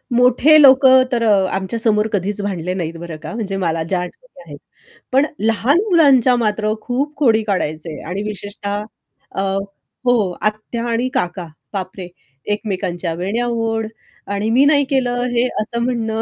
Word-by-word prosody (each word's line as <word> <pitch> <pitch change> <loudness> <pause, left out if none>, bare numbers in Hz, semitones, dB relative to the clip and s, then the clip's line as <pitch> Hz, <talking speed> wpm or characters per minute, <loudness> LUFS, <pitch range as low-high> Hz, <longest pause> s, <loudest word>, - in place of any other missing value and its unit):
मोठे 250 +5 +5
लोकं 260 -1 +7
तर 235 -1 0
आमच्या 195 +1 +1
समोर 215 -1 +2
कधीच 205 +1 -1
भांडले 185 -3 -3
नाहीत 170 -3 -3
बरं 170 -2 -7
का, - - -6
म्हणजे 200 -4 -3
मला 165 -3 -1
ज्या 180 +3 -1
आठवणी - - -10
आहेत. - - -9 0.5
पण 270 +3 +4
लहान 225 +8 +2
मुलांच्या 275 - +5
मात्र 215 -2 0
खूप 275 +4 -2
खोडी 225 -6 +3
काढायचे 160 -6 -3
आणि 180 +5 -4
विशेषतः 205 0 -5 0.5
अ, 195 - -1 0.6
हो 230 -7 +2
आत्या 215 +2 -2
आणि 235 +2 0
काका 180 -8 -2 0.3
बाप 190 -2 -4
रे! 180 -2 -6 0.4
एकमेकांच्या 185 -5 -2
वेण्या 195 +8 -2
ओढ 225 -1 -1 0.5
आणि 205 +2 -1
मी 250 +4 +4
नाही 285 -1 +4
केलं 250 -3 0
हे 240 0 +2 0.2
असं 235 +2 -4
म्हणणं 225 -3 -1
215 Hz, 150 wpm, -18 LUFS, 190-245 Hz, 0.6 s, लोकं